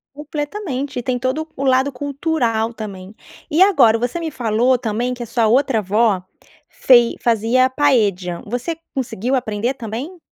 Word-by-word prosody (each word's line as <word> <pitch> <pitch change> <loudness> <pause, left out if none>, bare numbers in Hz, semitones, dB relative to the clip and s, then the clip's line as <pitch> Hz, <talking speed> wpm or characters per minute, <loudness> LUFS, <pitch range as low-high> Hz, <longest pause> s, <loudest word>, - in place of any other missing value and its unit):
Completamente. 290 -2 -4
E - - -6
tem 250 0 -1
todo 260 +6 -1
o 275 - -2
lado 265 +1 +3
cultural 255 -5 -1
também. 200 -3 -8 0.4
E 320 +5 +2
agora 255 - +5
você 245 +7 -2
me 330 -2 -4
falou 245 0 +1
também 240 +1 -2
que 245 - -8
a - - -3
sua 230 0 0
outra 250 0 +2
avó 205 -1 +1 0.5
fei 240 -2 +4
fazia 235 +3 +2
paella, 210 - +1
você 245 +9 -4 0.2
conseguiu 255 -1 -2
aprender 235 0 -1
também? 255 - -6
250 Hz, 150 wpm, -19 LUFS, 225-275 Hz, 0.5 s, agora